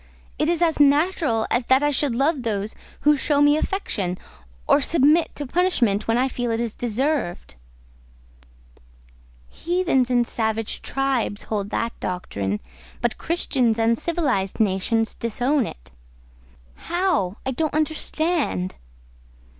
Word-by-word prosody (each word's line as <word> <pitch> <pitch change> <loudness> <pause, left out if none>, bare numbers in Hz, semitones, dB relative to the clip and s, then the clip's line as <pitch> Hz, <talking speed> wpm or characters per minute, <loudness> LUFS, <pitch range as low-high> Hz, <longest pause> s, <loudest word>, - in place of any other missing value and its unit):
It 305 - +2
is 345 0 +2
as 325 -3 +1
natural 290 -5 +3
as 245 0 +1
that 260 +3 +4
I 295 - +3
should 275 -3 +1
love 280 +2 +1
those 215 -3 -2 0.3
who 300 0 +5
show 285 +1 +1
me 290 0 +5
affection, 215 - -2 0.5
or 290 - +4
submit 310 +3 +3
to 290 - -4
punishment 250 - +1
when 230 +1 +2
I 255 +2 +2
feel 245 -2 -3
it 225 0 0
is 235 -2 -2
deserved." 245 - -2 2.0
"Heathens 340 -8 0
and 245 -1 +3
savage 220 -1 -2
tribes 270 -6 -1
hold 205 -2 -3
that 230 +2 -2
doctrine, 100 - -3 0.4
but 240 -2 -1
Christians 260 -9 +1
and 230 0 +3
civilised 260 - -1
nations 220 +2 +1
disown 245 +3 0
it." - - -11 0.8
"How? 345 - -1
I 265 - 0
don't 310 +3 -1
understand." 310 - -1
255 Hz, 130 wpm, -23 LUFS, 220-305 Hz, 2.0 s, who